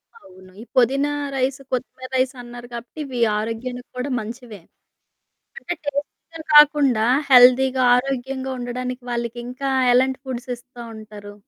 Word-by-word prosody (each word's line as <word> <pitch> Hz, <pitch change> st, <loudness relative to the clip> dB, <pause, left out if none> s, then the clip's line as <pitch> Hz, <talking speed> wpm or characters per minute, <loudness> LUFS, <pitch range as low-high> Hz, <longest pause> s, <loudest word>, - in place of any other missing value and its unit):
అవును. 185 Hz, -, -17 dB
ఈ -, -, -8 dB
పొదీన 270 Hz, +3 st, +3 dB, 0.3 s
రైసు, 265 Hz, +1 st, -1 dB
కొత్తిమీర 255 Hz, +1 st, -4 dB
రైసు 260 Hz, +1 st, 0 dB
అన్నారు 240 Hz, 0 st, -10 dB
కాబట్టి 235 Hz, +6 st, -9 dB
ఇవి 255 Hz, -3 st, -5 dB, 0.2 s
ఆరోగ్యానికి 245 Hz, +3 st, -5 dB
కూడా 250 Hz, +3 st, -3 dB
మంచివే. 225 Hz, -2 st, -9 dB, 1.0 s
అంటే -, -, -4 dB
టేస్టు‌గా 290 Hz, +3 st, -6 dB
కాకుండా 285 Hz, -6 st, +6 dB, 0.3 s
హెల్దీగా 255 Hz, +1 st, +6 dB
ఆరోగ్యంగా 265 Hz, +1 st, -3 dB
ఉండడానికి 250 Hz, +1 st, -5 dB
వాళ్ళకి 235 Hz, 0 st, -3 dB
ఇంకా 260 Hz, +2 st, -4 dB, 0.2 s
ఎలాంటి 260 Hz, +1 st, +2 dB
ఫుడ్స్ 255 Hz, -1 st, -6 dB
ఇస్తా 245 Hz, 0 st, -13 dB
ఉంటారు? 210 Hz, -1 st, -11 dB
250 Hz, 125 wpm, -22 LUFS, 240-265 Hz, 1.0 s, కాకుండా